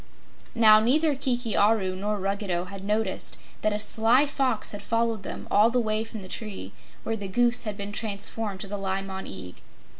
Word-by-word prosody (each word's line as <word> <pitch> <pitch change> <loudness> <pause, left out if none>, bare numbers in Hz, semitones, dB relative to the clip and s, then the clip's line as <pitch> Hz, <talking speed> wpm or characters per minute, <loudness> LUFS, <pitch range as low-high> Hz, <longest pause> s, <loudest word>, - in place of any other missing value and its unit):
Now, 215 -2 +7
neither 295 +7 +3
Kiki 245 -4 -1
Aru 200 -3 +3
nor 205 +2 -2
Ruggedo 195 -2 -1
had 195 +1 -9
noticed 210 -1 -2 0.2
that 215 - +2
a 210 - 0
sly 225 +5 +4
Fox 265 -5 +1
had 205 - -6
followed 230 -2 0
them - - -7
all 210 +3 +5
the 250 +1 +1
way 215 -1 0
from 220 -2 -8
the - - -9
tree 190 - -5 0.3
where 225 - -1
the 205 -2 -5
Goose 240 +5 +2
had 210 -2 -4
been 200 0 -5
transformed 205 -1 -3
to 200 - -4
the 205 +1 -4
Li 195 0 -2
Mon 190 0 -6
Eag. 90 -2 -8
210 Hz, 190 wpm, -26 LUFS, 195-230 Hz, 0.3 s, Now